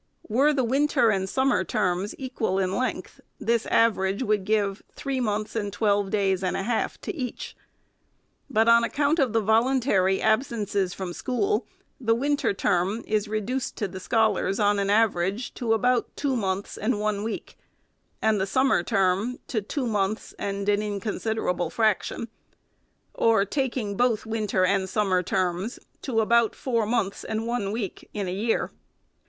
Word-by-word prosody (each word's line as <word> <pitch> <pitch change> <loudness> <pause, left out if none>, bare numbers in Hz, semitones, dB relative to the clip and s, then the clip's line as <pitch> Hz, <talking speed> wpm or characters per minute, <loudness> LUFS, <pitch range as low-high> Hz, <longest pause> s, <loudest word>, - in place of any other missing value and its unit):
Were 270 +7 +3
the 275 -3 +1
winter 260 -2 +3
and 190 -1 -1
summer 260 -6 +2
terms 180 +3 -1
equal 250 -7 -2
in 190 0 0
length, 230 -6 -3 0.2
this 230 0 0
average 205 -2 +2
would 210 -4 0
give 205 -1 0
three 275 -2 -3
months 215 -2 -2
and 205 -2 -2
twelve 205 -1 +1
days 195 -2 +1
and 185 - 0
a - - -2
half 230 +2 -1
to - - -4
each. 255 -7 -5 0.9
But, 225 -3 +2
on 235 0 +6
account 290 +6 +1
of 265 -5 +2
the 225 0 +2
voluntary 220 -3 +2
absences 215 -5 0
from 185 -2 -5
school, 400 - -1 0.3
the 225 -3 +2
winter 285 +4 +1
term 195 +3 0
is 215 0 0
reduced 215 +5 -2
to 210 - -2
the 190 0 -8
scholars, 215 -1 +1
on 205 -1 +3
an 200 0 0
average, 205 +1 +1
to 235 -2 -2
about 240 +2 +1
two 280 -3 0
months 195 -3 -2
and 215 0 0
one 210 -1 -1
week, 225 - -5 0.7
and 220 -3 +3
the 190 - 0
summer 260 +6 +3
term 200 +3 +1
to 220 -5 0
two 255 +6 -3
months 210 -2 -1
and 200 0 -3
an 205 0 +3
inconsiderable 205 -3 -2
frac 215 +1 +2
tion; 230 - -5 0.9
or, 225 -3 +3
taking 240 -4 -2
both 235 -1 +1
winter 215 -4 0
and 190 0 +1
summer 195 -3 +1
terms, 185 +5 -1 0.2
to 230 -5 0
about 235 0 +3
four 230 -5 -1
months 205 -4 -1
and 220 +1 -3
one 230 -4 -1
week 210 -4 -5
in 205 -2 -2
the 180 - -3
year. 220 +4 0
215 Hz, 160 wpm, -26 LUFS, 195-235 Hz, 0.9 s, on